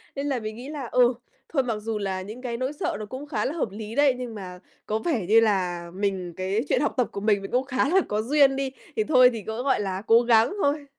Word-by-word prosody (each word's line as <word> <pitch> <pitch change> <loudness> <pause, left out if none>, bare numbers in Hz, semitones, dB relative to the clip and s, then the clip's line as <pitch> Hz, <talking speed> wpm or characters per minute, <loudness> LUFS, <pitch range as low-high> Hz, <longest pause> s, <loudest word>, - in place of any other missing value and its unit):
Nên 280 +1 -3
là 260 -3 0
mình 215 0 -6
nghĩ 250 +4 -8
là, 290 -4 -5
ừ, 250 0 +4 0.4
thôi, 270 -5 +1
mặc 235 -3 -2
dù 225 0 -3
là 190 -2 -2
những 215 +6 -9
cái 235 -2 -4
nỗi 260 +3 -2
sợ 290 - -2
nó 215 - -5
cũng 260 +6 -8
khá 220 -8 -1
là 285 - -1
hợp 315 -9 -2
lý 215 +2 -7
đấy, 285 -2 +4
nhưng 245 -3 -6
mà 180 -3 -8 0.3
có 215 +1 -1
vẻ 235 - -1
như 225 +2 +6
là 180 -5 0
mình 190 -3 -2
cái 190 +4 0
chuyện - - +2
học 290 - 0
tập 250 - +2
của 200 - -5
mình, 205 -2 +2
mình 195 - -7
cũng 250 +2 +2
khá 265 +1 0
là 380 +3 +4
có 210 +1 -1
duyên 275 +2 +4
đi, 270 -1 -2 0.2
thì 435 - +1
thôi 255 -7 +6
thì 225 - -5
cứ, 220 +3 -3
gọi 265 -6 +2
là, 190 -1 -3
cố 230 +1 +6
gắng 235 - +4
thôi. 285 0 +1
230 Hz, 275 wpm, -25 LUFS, 205-270 Hz, 0.4 s, như